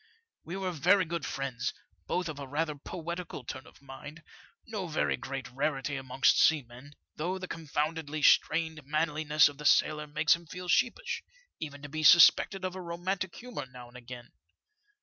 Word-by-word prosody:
We 175 +4 -6
were 190 -1 -2
very 180 +4 +3
good 170 -1 -4
friends, 130 -3 -3 0.3
both 180 -1 -1
of 155 -3 -6
a 140 - -6
rather 150 +3 -1
poetical 170 +1 -6
turn 130 +4 -7
of - - -19
mind, 145 +4 -10 0.4
no 210 -5 -4
very 160 - 0
great 130 0 -6
rarity 140 +1 -1
amongst 130 0 +2
seamen, 140 -2 +1 0.2
though 180 +5 -2
the 185 0 -6
confoundedly 155 -1 -3
strained" 160 0 +3
manliness 150 +1 +2
of 145 -1 -8
the 150 - -8
sailor 150 +1 +3
makes 150 +2 +3
him 170 0 -13
feel 180 +2 -8
sheepish, 485 - +1 0.4
even 145 -2 -7
to - - -5
be 155 +2 -4
suspected 180 +4 +6
of 185 - -3
a 185 - -6
romantic 175 +1 -3
humour 245 - -7
now 125 -1 -12
and 120 - -20
again. 120 0 -10
155 Hz, 170 wpm, -30 LUFS, 140-170 Hz, 0.4 s, suspected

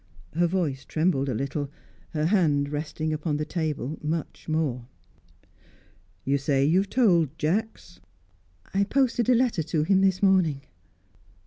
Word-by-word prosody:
Her 175 +2 +2
voice 165 -7 -1
trembled 155 -4 0
a 125 - -1
little; 140 +3 -3 0.4
her 155 -1 -1
hand, 155 -7 +2
resting 155 +1 -3
upon 150 -1 -2
the 150 - -2
table, 155 -3 -3
much 160 +1 -4
more. 140 -7 -1 1.4
"You 140 +1 +1
say 135 0 +1
you 165 +5 +4
have 195 0 -2
told 175 - +2
Jacks?" 180 +1 -2 0.7
"I 195 +1 +3
posted 245 0 +1
a 250 - +6
letter 235 -7 +1
to 155 0 -1
him 190 +3 +3
this 190 0 +2
morning." 180 -8 +3
160 Hz, 140 wpm, -26 LUFS, 145-190 Hz, 1.4 s, a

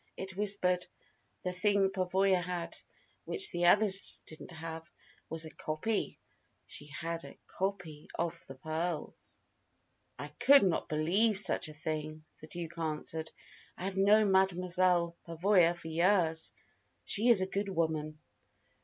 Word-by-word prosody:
It 190 -1 -7
whispered: 195 -3 +2 0.6
"The 180 - -2
thing 195 +1 +2
Pavoya 190 0 +1
had, 175 -1 -4 0.5
which 410 -2 +1
the 175 -1 +1
other 210 +4 +5 0.4
didn't 160 +3 -11
have, 165 -1 -8 0.4
was 160 0 0
a 160 - -9
copy. 155 +8 -3 0.5
She 145 - -8
had 165 +3 -5
a - - -12
copy 180 -6 -5
of 170 -1 -3
the 135 - -9
pearls." 160 +3 -5 0.8
"I 145 +3 -7
could 275 - +5
not 185 -4 0
believe 190 +8 +2
such 190 -5 +2
a - - -10
thing," 155 0 -5
the 155 - -12
Duke 170 0 -7
answered. 160 0 -3 0.5
"I - - -6
have 190 0 -3
known 205 +1 +4
Mademoiselle 180 -2 +2
Pavoya 175 +1 +3
for 175 - -10
years. 165 -1 +1 0.5
She 225 +4 +4
is 225 -5 +7
a - - +1
good 200 +1 -3
woman." 160 -4 -2
175 Hz, 135 wpm, -31 LUFS, 160-195 Hz, 0.8 s, is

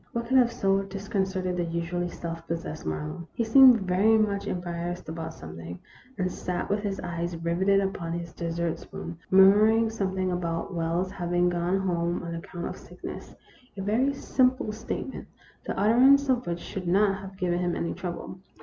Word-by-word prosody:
What 235 0 -2
could 260 +3 +3
have 240 -1 +4
so 195 -3 +1
disconcerted 190 -2 -2
the 175 - +1
usually 170 +1 -2
self 165 -1 -7
possessed 165 - -4
Marlowe? 80 - -4
He 230 - +1
seemed 250 0 +7
very 195 +4 +3
much 205 -2 0
em 180 - -1
barrassed 175 0 -5
about 160 0 -5
something, 80 +2 -8 0.4
and 185 -2 0
sat 180 +1 -3
with 205 - +2
his 200 -2 -3
eyes 170 -1 -3
riveted 180 +4 +2
upon 185 -4 -3
his 170 -1 -5
dessert 170 -1 -2
spoon, 170 -1 -8
murmuring 215 +4 +6
some 195 -4 -2
thing 185 -1 0
about 170 -1 -2
Wells's 170 +2 -1
having 175 -1 +1
gone 175 +2 0
home 175 -2 -1
on 170 -1 -5
account 175 +1 -6
of - - -5
sickness - - -9 0.4
a 195 - -3
very 235 +7 +2
simple 260 -3 +1
statement, 220 +4 -5 0.4
the - - -3
utterance 260 +7 +5
of 245 -6 +1
which 170 0 -1
should 185 -2 -6
not 195 +2 +3
have 190 0 -10
given 175 -2 0
him 175 -1 0
any 170 - -2
trouble. 180 +1 -6
180 Hz, 175 wpm, -27 LUFS, 170-205 Hz, 0.4 s, seemed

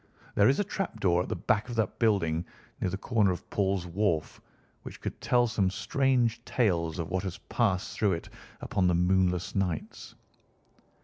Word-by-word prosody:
There 100 +3 +5
is 135 - +2
a - - +3
trap 195 -1 -4
door 90 -2 +3
at - - -5
the - - -1
back 105 +4 0
of 120 - -4
that 110 -4 -1
building, 90 -8 +2 0.4
near - - 0
the 95 - -3
corner 105 -1 +2
of 90 - -6
Paul's 95 -2 0
Wharf, 90 -3 -1 0.4
which - - -10
could - - -6
tell 120 -1 +3
some 100 -5 +1
strange 120 +4 +1
tales 85 -9 0
of 85 -2 -3
what 95 - 0
has 95 -2 -5
passed 100 -6 0
through 105 -3 +2
it 85 - -5 0.3
upon 95 -2 +1
the 90 - +3
moonless 90 0 +2
nights." 90 -5 -3
95 Hz, 180 wpm, -29 LUFS, 90-110 Hz, 0.4 s, There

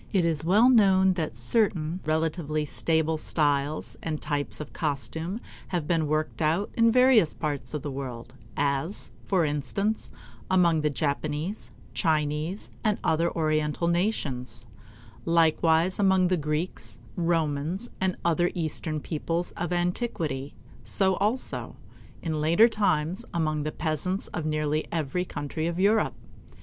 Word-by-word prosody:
It 185 -4 +2
is 160 -2 0
well 205 +8 +5
known 190 -6 +5
that 155 -10 -3
certain 170 - +1
relatively 155 -1 0
stable 160 +1 +1
styles 145 -1 0
and 155 -2 -3
types 145 -8 -2
of 150 - -7
costume 160 - -2 0.3
have 170 -5 -2
been 165 -3 +1
worked 155 +2 -1
out 165 +6 +1
in 230 -1 +4
various 250 -8 +5
parts 145 -3 -3
of 150 - -4
the 145 - -3
world; 125 -3 -6 0.2
as, 140 +6 -1
for 185 -4 +2
instance, 150 +9 -1 0.4
among 170 -4 +4
the 150 - +2
Japanese, 150 +6 -2 0.2
Chinese, 155 +3 -1
and 215 -2 +2
other 160 +2 +2
Oriental 155 0 0
nations; 145 - -1 0.6
likewise 165 +2 +3
among 190 -2 +4
the 185 - +3
Greeks, 150 -7 -3 0.2
Romans, 165 +4 -1
and 190 -1 0
other 175 +1 +3
Eastern 155 -2 -1
peoples 165 +3 -2
of 175 0 -4
antiquity 175 - -2 0.3
so 190 -2 +3
also, 220 +6 -2 0.5
in 155 -2 -1
later 170 +9 +6
times, 190 -4 0
among 155 -2 0
the 155 +1 -2
peasants 165 +5 -2
of 160 -3 -3
nearly 155 0 0
every 165 +2 -1
country 155 0 -3
of 170 +1 -3
Europe. 210 +3 +3
160 Hz, 135 wpm, -27 LUFS, 150-185 Hz, 0.6 s, later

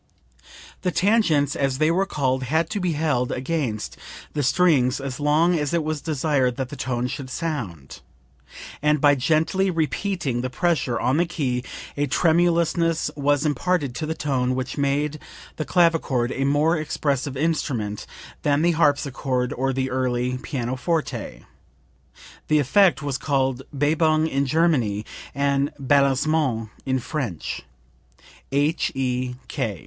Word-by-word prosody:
The 185 - 0
tangents, 170 -7 +2
as 135 -2 0
they 155 +2 +3
were 190 +3 +1
called, 130 -6 0
had 160 +8 0
to 210 - -1
be 180 -3 0
held 145 -5 0
against 130 -5 -2 0.4
the 150 - -1
strings 140 -3 +3
as 135 -2 -5
long 155 +4 +3
as 150 +2 -1
it 165 - +1
was 155 -1 -2
desired 140 -5 0
that 130 -2 -3
the 145 - -7
tone 125 -2 -2
should 130 +1 -5
sound, 120 - -5 0.8
and 150 +1 +3
by 145 0 +5
gently 160 +8 +1
repeating 165 -5 -1
the 130 - -2
pressure 145 -5 0
on 130 +3 +1
the 175 +1 +2
key 130 -7 -2 0.3
a 145 0 0
tremulousness 165 +1 +2
was 145 +1 +1
imparted 150 -1 0
to 155 +5 -4
the 160 - -2
tone 130 -4 0
which 130 0 -3
made 145 +2 0 0.4
the 155 - -2
clavichord 165 -8 +2
a 135 - -1
more 150 +4 +3
expressive 145 -3 -2
instrument 130 -9 -1 0.3
than 145 +1 +2
the 175 - +4
harpsichord 140 -5 +1
or 135 +2 0
the 130 0 -2
early 125 0 -1
pianoforte. 130 - -3 1.0
The 155 - +3
effect 160 +4 +4
was 140 -3 -2
called 135 -3 0
Bebung 155 +2 +2
in 140 -2 0
German, 130 -10 +1 0.3
and 140 0 +1
Balancement 140 -3 +2 0.2
in 130 0 +2
French. 125 - -4 0.9
H.E. 135 -4 0
145 Hz, 135 wpm, -23 LUFS, 130-160 Hz, 1.0 s, by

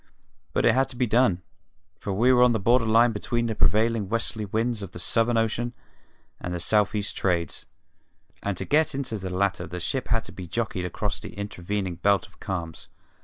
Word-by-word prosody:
But - - +2
it 115 - +6
had 135 +2 +2
to 130 - -5
be 125 0 +1
done, 110 -6 +2 0.6
for 100 - -4
we 120 +7 +4
were 125 - +5
on 125 -1 +6
the 110 - 0
border 115 +3 +3
line 115 +2 +5
between 120 +2 -1
the 115 - -1
prevailing 110 -1 +2
westerly 110 -1 -1
winds 110 +2 -1
of 95 -2 -7
the - - -8
Southern 115 +8 +2
Ocean 115 +2 0 0.7
and 90 - -5
the - - -3
south 105 +4 +2
east 100 -1 -2
Trades, 85 -4 -1 0.7
and 100 -2 -2
to - - -3
get 155 0 +2
into 130 -6 -2
the 95 0 -5
latter 95 0 0
the 90 - -6
ship 130 +9 -2
had 115 -1 +1
to - - -9
be 90 -2 -8
jockeyed 105 -2 -2
across 90 - -2
the - - -9
intervening 100 -2 -3
belt 100 0 +2
of - - -26
calms. 85 -4 -5
105 Hz, 205 wpm, -26 LUFS, 95-120 Hz, 0.7 s, it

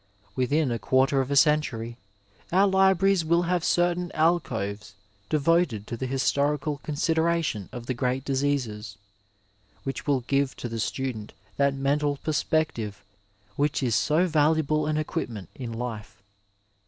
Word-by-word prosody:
Within 140 +2 +1
a 115 - -2
quarter 135 +2 +2
of 130 - -4
a 140 - 0
century 135 -6 +2 0.5
our 190 +3 +5
libraries 190 -1 +3
wiQ 170 +2 +2
have 175 -1 0
certain 175 0 +1
alcoves 110 - 0 0.3
devoted 155 - +2
to 120 - -5
the 130 +3 -4
historical 140 +2 0
con 150 - -5
sideration 160 - 0
of 120 -1 -7
the 130 - -1
great 125 +2 -1
diseases, 130 -7 -2 0.9
which 135 +2 -5
will 140 -3 +2
give 135 +2 0
to - - -5
the 115 -1 -5
student 120 -2 -3 0.2
that 140 -1 +2
mental 145 +1 0
perspective 145 -10 -1 0.5
which 145 -1 0
is 120 -3 +1
so 150 - +3
valuable 155 -2 +2
an 155 0 0
equipment 115 - -4
in 125 -3 -6
life. 115 -4 -6
140 Hz, 140 wpm, -26 LUFS, 120-155 Hz, 0.9 s, our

